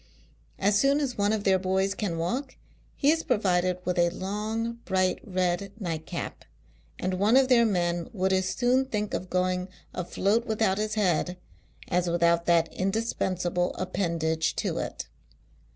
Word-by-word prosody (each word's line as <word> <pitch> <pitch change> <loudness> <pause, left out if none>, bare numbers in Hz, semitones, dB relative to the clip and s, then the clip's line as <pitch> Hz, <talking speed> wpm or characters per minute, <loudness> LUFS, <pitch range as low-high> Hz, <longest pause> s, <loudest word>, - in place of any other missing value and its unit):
As 205 +1 +3
soon 275 +3 +3
as 275 -4 -2
one 205 0 +1
of 215 -2 -1
their 190 -2 +3
boys 190 +1 +1
can 190 -6 -3
walk, 250 +12 -2 0.4
he 285 - +3
is 325 0 +1
provided 185 - +1
with 180 0 0
a 175 0 +4
long 215 +5 -3
bright 185 -1 +1
red 185 0 -1
nightcap; 165 -5 -5 0.5
and 185 0 -2
one 215 +6 +5
of 265 -1 +4
their 235 -2 +5
men 175 -4 0
would 190 -3 0
as 190 0 +1
soon 255 +2 +2
think 210 -5 -3
of 185 - -3
going 180 0 0 0.3
afloat 200 +6 0
without 215 -3 +1
his 215 0 -1
head, 180 -3 +1 0.5
as 180 0 +1
without 170 0 +2
that 170 -1 +3
indispensable 185 -3 -1
appendage 160 -3 -1
to - - -1
it. - - -4
190 Hz, 150 wpm, -27 LUFS, 180-215 Hz, 0.5 s, one